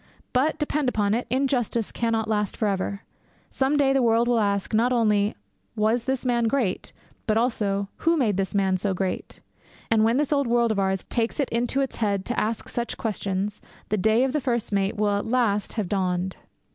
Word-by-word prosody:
But, 270 Hz, +5 st, +2 dB
depend 300 Hz, -2 st, 0 dB
upon 205 Hz, -4 st, +1 dB
it, 240 Hz, +2 st, -1 dB
injustice 245 Hz, -3 st, 0 dB
cannot 225 Hz, -2 st, -1 dB
last 210 Hz, -2 st, -1 dB
for 215 Hz, -, +1 dB
ever. 200 Hz, +1 st, -2 dB, 0.5 s
Some 275 Hz, +2 st, +1 dB
day 275 Hz, -2 st, +3 dB
the 270 Hz, -, +3 dB
world 230 Hz, 0 st, +3 dB
will 240 Hz, -1 st, +3 dB
ask, 200 Hz, 0 st, 0 dB
not 235 Hz, +3 st, +3 dB
only, 210 Hz, -4 st, +2 dB, 0.4 s
'Was 220 Hz, +2 st, +1 dB
this 265 Hz, -1 st, -1 dB
man 240 Hz, -2 st, +2 dB
great?' 225 Hz, -5 st, 0 dB, 0.4 s
but 215 Hz, 0 st, +2 dB
also, 205 Hz, -4 st, 0 dB
'Who 330 Hz, 0 st, +2 dB
made 225 Hz, -9 st, +2 dB
this 195 Hz, +1 st, -2 dB
man 190 Hz, -2 st, +2 dB
so 195 Hz, 0 st, -1 dB
great?' 185 Hz, 0 st, -3 dB, 0.5 s
And 220 Hz, -1 st, +4 dB
when 230 Hz, +3 st, +3 dB
this 295 Hz, +1 st, +1 dB
old 280 Hz, -3 st, +1 dB
world 235 Hz, -1 st, +2 dB
of 210 Hz, -, 0 dB
ours 190 Hz, -1 st, 0 dB
takes 230 Hz, +4 st, -2 dB
it 280 Hz, -, +1 dB
into 245 Hz, +4 st, 0 dB
its 270 Hz, -, -3 dB
head 200 Hz, -3 st, 0 dB
to 245 Hz, -, -1 dB
ask 220 Hz, +1 st, -2 dB
such 240 Hz, -1 st, -3 dB
questions, 205 Hz, -2 st, -3 dB, 0.3 s
the 215 Hz, -, +1 dB
day 220 Hz, +5 st, +3 dB
of 265 Hz, 0 st, 0 dB
the 300 Hz, -, 0 dB
first 240 Hz, -4 st, -1 dB
mate 200 Hz, +1 st, 0 dB
will 205 Hz, -1 st, +2 dB
at -, -, -5 dB
last 225 Hz, -4 st, +1 dB
have 215 Hz, -5 st, -2 dB
dawned. 185 Hz, -1 st, -1 dB
225 Hz, 200 wpm, -25 LUFS, 200-245 Hz, 0.5 s, And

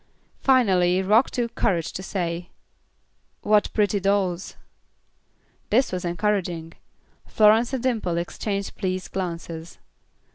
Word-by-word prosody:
Finally 190 Hz, -8 st, +3 dB
Rock 215 Hz, +6 st, +4 dB
took 235 Hz, -2 st, -2 dB
courage 170 Hz, -4 st, 0 dB
to -, -, -5 dB
say, 175 Hz, -3 st, -3 dB, 0.9 s
"What 210 Hz, 0 st, +2 dB
pretty 205 Hz, -1 st, +1 dB
dolls." 190 Hz, -2 st, 0 dB, 1.1 s
This 250 Hz, +5 st, +2 dB
was 180 Hz, -1 st, -3 dB
encouraging; 175 Hz, -3 st, -1 dB, 0.5 s
Florence 220 Hz, +3 st, +4 dB
and 260 Hz, -3 st, -3 dB
Dimple 220 Hz, -9 st, 0 dB
exchanged 200 Hz, +3 st, -3 dB
pleased 185 Hz, -2 st, -3 dB
glances. 170 Hz, -2 st, -5 dB
190 Hz, 105 wpm, -24 LUFS, 175-215 Hz, 1.1 s, Rock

